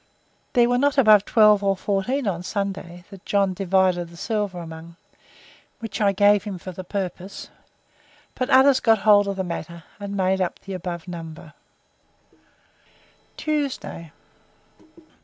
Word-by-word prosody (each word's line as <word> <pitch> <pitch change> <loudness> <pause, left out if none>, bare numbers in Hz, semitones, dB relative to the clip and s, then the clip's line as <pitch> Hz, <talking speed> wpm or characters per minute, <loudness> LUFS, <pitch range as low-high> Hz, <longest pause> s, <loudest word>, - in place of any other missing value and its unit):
There 240 -1 +4
were 245 0 +1
not 285 +1 +1
above 215 -6 +6
twelve 210 -2 +4
or 195 -1 +1
fourteen 205 +8 -1
on 180 -4 -2
Sunday, 190 -2 -5
that 195 -1 -12
John 200 -2 +1
divided 185 -2 +1
the 170 - -14
silver 205 -2 -2
among, 165 0 -9 0.8
which 220 -2 -6
I 200 -1 +4
gave 205 +1 +4
him 205 -3 -6
for 185 +1 -8
that 185 +1 -8
purpose; 190 -1 -5 0.8
but 255 - -3
others 265 0 +5
got 225 -1 +4
hold 205 -1 +6
of 200 - -2
the 190 - -2
matter, 170 -1 -6 0.2
and 200 0 -5
made 190 0 +1
up 180 - -2
to - - -32
the 195 - -6
above 175 -1 -6
number. 165 -2 -9 1.8
Tuesday. 280 - -3
195 Hz, 145 wpm, -23 LUFS, 175-210 Hz, 1.8 s, above